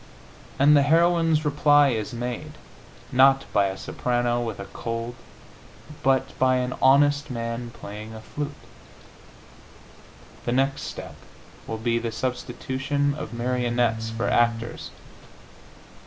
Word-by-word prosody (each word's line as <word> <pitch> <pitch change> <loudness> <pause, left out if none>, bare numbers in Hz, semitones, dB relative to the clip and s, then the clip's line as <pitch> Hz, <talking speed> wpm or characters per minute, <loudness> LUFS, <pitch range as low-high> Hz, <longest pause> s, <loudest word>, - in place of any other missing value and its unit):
And 145 +2 +6
the 145 - +6
heroine's 165 +1 +3
reply 145 -1 +4
is 110 -4 -2
made, 120 0 -5 0.6
not 135 +1 +5
by 100 -1 +4
a 95 0 -5
soprano 120 +1 -1
with 115 -4 -4
a 100 - -5
cold, 115 +2 -5 0.9
but 135 0 +1
by 130 0 +4
an 125 0 -1
honest 145 +2 +4
man 115 -1 -4
playing 110 0 -9
a 110 - -9
flute. 145 +6 -5 2.0
The 120 - 0
next 135 +1 0
step - - -7 0.5
will 110 - -3
be 115 +1 0
the 115 0 -3
substitution 130 +3 -2
of 140 -6 -6
marionettes 120 -2 0
for 115 +1 -2
actors. 115 0 0
125 Hz, 120 wpm, -25 LUFS, 115-140 Hz, 2.0 s, And